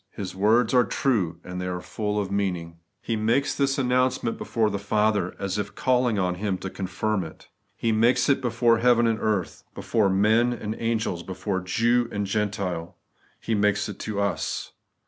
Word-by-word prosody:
His 95 -2 -6
words 110 +5 +3
are 125 -1 +6
true, 95 -7 0
and 90 0 -6
they 90 - -3
are 90 -1 -3
full 105 +4 -3
of 100 -2 -3
meaning. 90 -4 -2 0.2
He 115 - -1
makes 115 +6 +1
this 135 -1 0
announcement 130 -2 +1
before 110 -2 0
the 100 - -2
Father, 105 -2 +1
as 100 +1 -2
if 105 0 -4
calling 125 -3 +2
on 90 -2 +1
Him 100 -3 0
to 95 - -6
confirm 95 +1 -2
it. 80 - -12 0.3
He 115 0 0
makes 115 +3 +3
it 140 -2 +3
before 115 -1 +2
heaven 120 -1 +4
and 115 -1 +1
earth, 105 -5 -1
before 110 -4 +1
men 110 +5 +3
and 110 -2 -4
angels, 110 -6 -1
before 95 +2 -3
Jew 115 +6 +1
and 100 0 -2
Gentile. 100 -4 -2 0.4
He 115 - -2
makes 105 -1 +2
it 105 - -8
to 105 -2 -3
us. 100 0 -2
105 Hz, 180 wpm, -25 LUFS, 95-115 Hz, 0.4 s, are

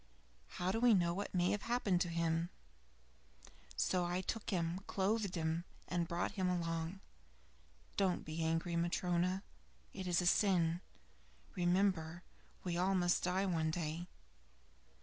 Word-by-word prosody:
How 180 +1 +1
do 225 - 0
we 240 -2 +6
know 170 -2 +2
what 200 +3 -3
may 180 -1 +2
have 205 - 0
happened 210 -7 +1
to 175 - +1
him? 165 0 0 1.3
So 180 -1 +1
I 175 +1 0
took 215 +3 -3
him, 175 -3 0
clothed 200 0 0
him, 160 0 0 0.2
and 175 -1 0
brought 170 +1 -1
him 190 -3 0
along. 165 +1 -2 1.0
Don't 190 -3 +1
be 155 +1 -5
so 160 - +1
angry, 165 +1 0
Matryona. 175 +2 +1 0.5
It 190 -2 -5
is 175 -1 +3
a 180 - 0
sin. 175 -3 +3 0.7
Remember, 175 -2 +1 0.4
we 175 -2 -1
all 190 +2 +2
must 175 -1 +3
die 185 +2 +1
one 165 -4 +1
day." 165 +1 -3
175 Hz, 145 wpm, -37 LUFS, 170-190 Hz, 1.3 s, we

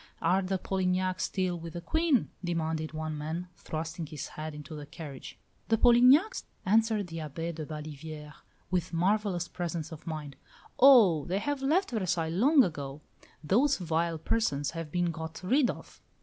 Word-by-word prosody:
"Are 180 +4 +2
the 190 0 -1
Polignacs 185 0 0
still 185 -3 -1
with 165 -1 -8
the 175 - -5
Queen?" 315 - +1
demanded 160 -2 -2
one 155 0 -4
man, 160 +4 -4
thrusting 160 +1 -5
his 150 -2 -6
head 155 0 -6
into 150 0 -9
the 150 -1 -7
carriage. 145 -3 -9 0.3
"The 225 - +3
Polignacs?" 250 - +5 0.2
answered 220 0 +3
the 165 -2 -8
Abbé 165 +2 -4
de 155 -2 -6
Baliviere, 150 0 -7 0.4
with 180 -1 -1
marvellous 185 0 +1
presence 170 -3 -4
of 160 0 -10
mind. 150 -3 -5 0.4
"Oh! 220 - +7
they 185 +2 -1
have 275 +6 -2
left 320 +7 +2
Versailles 180 -7 0
long 260 - +5
ago. 145 - -4 0.4
Those 255 - +3
vile 165 -1 -1
persons 150 -6 0
have 165 -2 -6
been 175 0 +1
got 160 -1 -6
rid 255 +7 +3
of." - - -8
170 Hz, 160 wpm, -30 LUFS, 155-205 Hz, 0.4 s, Oh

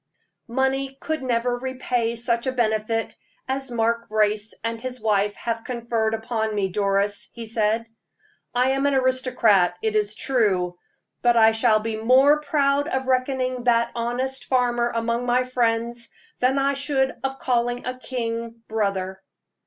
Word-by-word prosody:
"Money 265 +2 -1
could 315 -2 -3
never 245 -1 0
repay 250 -2 -1
such 235 +1 0
a - - +2
benefit 225 -2 -1 0.3
as 270 0 -2
Mark 235 0 0
Brace 215 0 +1
and 230 0 -3
his 255 0 -4
wife 210 -2 +1
have 230 -1 -3
conferred 235 -2 -1
upon 220 -1 -2
me, 195 -2 0
Doris," 200 +1 0
he 235 -1 -7
said. 220 0 0 0.7
"I 250 +2 +2
am 270 +1 +1
an 280 - +2
aristocrat, 255 -8 +3
it 220 -1 0
is 210 0 +1
true; 200 -9 +1 0.5
but 240 -1 +4
I 220 -1 +7
shall 220 -1 +3
be 220 0 -3
more 270 +6 +5
proud 285 -1 +1
of 265 -4 -1
reckoning 255 -1 0
that 235 -1 +3
honest 245 +3 -2
farmer 240 -2 +1
among 235 +1 -1
my 250 +1 +3
friends 235 -1 -1 0.3
than 260 +2 +2
I 275 +1 +2
should 275 -1 0
of 270 0 -2
calling 245 -1 0
a 255 0 -4
king 230 -2 -4
brother." 195 -3 -2
235 Hz, 150 wpm, -23 LUFS, 220-255 Hz, 0.7 s, I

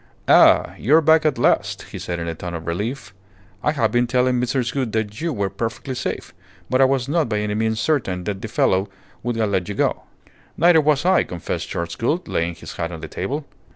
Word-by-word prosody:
"Ah! - - +6
You 140 +8 +4
are 165 - +6
back 160 0 +4
at 150 - 0
last!" - - +1
he - - -6
said 85 - -4
in 85 0 -4
a 85 - -2
tone 85 +1 -6
of 80 0 -6
relief. 100 +4 -4 0.5
"I 150 - +2
have 115 -7 +1
been 120 +1 +2
telling 125 0 +2
Mrs. 125 -1 -1
Gould 130 -6 -2
that 110 +1 -2
you 170 0 -1
were 100 -7 -2
perfectly 120 +3 -4
safe, 125 - -4 0.4
but 130 +1 +3
I - - +7
was 130 -1 +1
not 155 -2 +1
by 105 - 0
any 105 0 -1
means 110 +1 0
certain 110 - 0
that 100 0 -4
the - - -4
fellow 95 -2 +1 0.3
would 120 0 -2
have 110 -2 0
let 95 -1 -1
you 105 - -4
go." - - 0 0.6
"Neither 170 -2 +5
was 150 +1 +2
I," 185 - +5
confessed 85 -2 -5
Charles 85 0 -4
Gould, 155 - -1
laying 85 +1 -1
his - - -10
hat 85 +1 -3
on 80 -2 -7
the 80 - -6
table. 140 - -4
115 Hz, 225 wpm, -21 LUFS, 95-135 Hz, 0.6 s, I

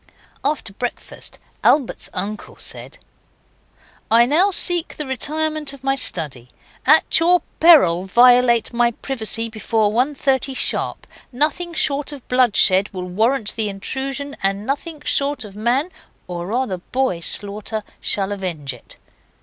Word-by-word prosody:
After 275 -8 -2
breakfast 245 +4 -6 0.3
Albert's 280 -5 +2
uncle 200 +3 -5
said - - -9 1.1
'I 230 +2 +6
now 325 +10 +3
seek 350 -3 0
the 300 - -1
retirement 305 +2 -1
of 270 -2 -14
my 270 0 +2
study. 145 - -2 0.4
At 310 +2 +5
your 345 0 +3 0.2
peril 190 - +6
violate 240 +2 +4
my 235 0 +3
privacy 230 -2 -1
before 220 -1 0
1.30 265 +2 0
sharp. - - -2 0.3
Nothing 310 +6 -1
short 290 -1 0
of 280 -4 -10
bloodshed 210 -6 +4
will 185 -2 -5
warrant 220 +5 0
the 220 -2 0
intrusion, 270 +8 -4
and 195 +1 0
nothing 295 +4 -3
short 280 -3 -1
of 200 -2 -12
man 245 - 0 0.3
or 175 -1 -6
rather 230 -3 -1
boy 255 -1 -1
slaughter 205 +4 -2 0.2
shall 195 0 -1
avenge 170 -9 -4
it. 120 - -16
245 Hz, 130 wpm, -20 LUFS, 205-280 Hz, 1.1 s, I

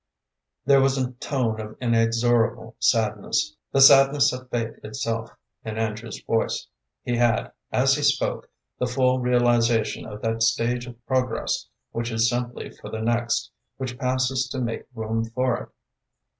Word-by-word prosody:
There 140 0 +6
was 135 0 +2
a 130 -1 -1
tone 120 -3 -2
of 110 0 -9
inexorable 115 0 +1
sadness, 115 +7 +1 0.2
the 135 - +3
sadness 135 +1 +7
of 125 0 -8
fate 115 -2 -3
itself 115 +1 -3 0.3
in 110 0 -5
Andrew's 110 0 -3
voice. 115 - 0 0.4
He 120 -1 -1
had, 120 -2 +2 0.2
as - - +3
he - - -1
spoke, - - 0 0.3
the 125 - +1
full 130 +1 +2
realization 120 -2 +2
of 105 0 -9
that 115 0 -1
stage 120 +2 +1
of 120 -1 -12
progress 130 -1 -1 0.2
which 115 0 -3
is 110 0 +2
simply 120 +1 -3
for - - -11
the 110 - -5
next, 115 - 0 0.3
which 130 -1 -5
passes 130 0 0
to 130 - -4
make 120 -2 -3
room 110 0 -1
for 125 +2 0
it. - - -9
120 Hz, 150 wpm, -24 LUFS, 115-130 Hz, 0.4 s, sadness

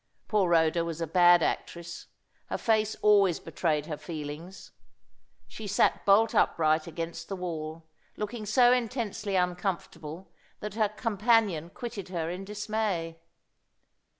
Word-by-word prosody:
Poor 205 -5 +2
Rhoda 165 0 +3
was 165 -1 -5
a 165 - -1
bad 175 +1 +5
actress. 170 0 -4 0.4
Her - - -2
face 220 -2 +1
always 200 -5 +5
betrayed 150 -4 -1
her 155 -2 -5
feelings. 160 +3 -8 0.8
She 220 - -8
sat 200 - +2
bolt 210 +3 +5
upright 155 0 +2
against 165 0 -6
the 195 - -3
wall, 160 -3 -5 0.3
looking 215 0 -5
so 245 +3 +5
intensely 225 -4 -2
uncomfortable 180 -2 -3 0.3
that 210 -1 -6
her 215 -1 +1
companion 210 -6 +1
quitted 220 -2 -7
her 170 -2 -2
in 185 +2 -6
dismay. 205 -5 -2
185 Hz, 125 wpm, -28 LUFS, 165-210 Hz, 0.8 s, bad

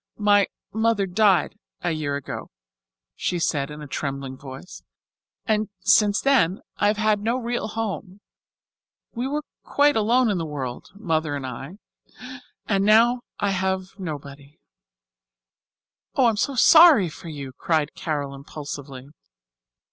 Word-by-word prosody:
"My 205 -1 +4 0.3
mother 220 -2 +1
died 195 +1 +2 0.2
a 175 - 0
year 150 -3 -2
ago," 140 - -6 0.7
she 180 - -2
said 145 -4 -1
in 150 0 -8
a - - -8
trembling 135 -1 -4
voice, 135 +5 -10 0.6
"and 215 -1 0
since 205 -2 +4
then 235 -10 +3 0.2
I 205 - +2
have 210 0 +1
had 215 -1 +2
no 230 +4 0
real 240 -2 -2
home. 210 -3 -5 0.9
We 245 +2 -2
were 295 +2 -2 0.2
quite 290 +1 +2
alone 230 +2 +3
in 190 - -1
the - - -2
world, 135 -5 -6
Mother 160 -7 -1
and 140 -2 -5
I, 135 +8 -7 0.9
and 195 -2 +1
now 230 +4 +5 0.2
I 200 - +1
have 190 0 -1
nobody." 145 -4 -8 1.6
"Oh, 265 - +4
I'm 225 -3 +2
so 275 +5 0
sorry 310 - +7
for 165 +1 -10
you," 140 -4 -7
cried 155 +1 -1
Carol 145 -4 -3
impulsively. 140 -1 -8
190 Hz, 135 wpm, -24 LUFS, 145-220 Hz, 1.6 s, sorry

